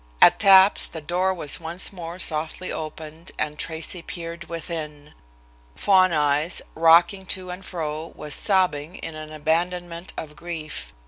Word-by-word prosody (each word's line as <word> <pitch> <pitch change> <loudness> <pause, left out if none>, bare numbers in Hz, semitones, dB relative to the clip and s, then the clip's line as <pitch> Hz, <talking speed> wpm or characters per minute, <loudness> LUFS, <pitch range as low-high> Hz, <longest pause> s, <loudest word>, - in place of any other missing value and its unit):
At - - +7
taps 195 0 +7
the 165 - -7
door 180 +5 0
was 165 -6 -1
once 170 +4 -3
more 170 -1 -7
softly 160 +1 -1
opened 160 +1 -7
and 150 0 -3
Tracy 165 +2 -4
peered 170 +1 -6
within. 155 -3 -6 0.6
Fawn 185 -2 +4
Eyes, 150 +2 +1
rocking 170 +4 +5
to 185 -2 -3
and 180 +2 -8
fro, 160 -3 -4
was 150 -1 -5
sobbing 180 -5 +1
in 165 - -7
an 155 0 -8
abandonment 170 +3 -2
of 150 -1 -6
grief. 155 - -6
165 Hz, 140 wpm, -24 LUFS, 155-180 Hz, 0.6 s, At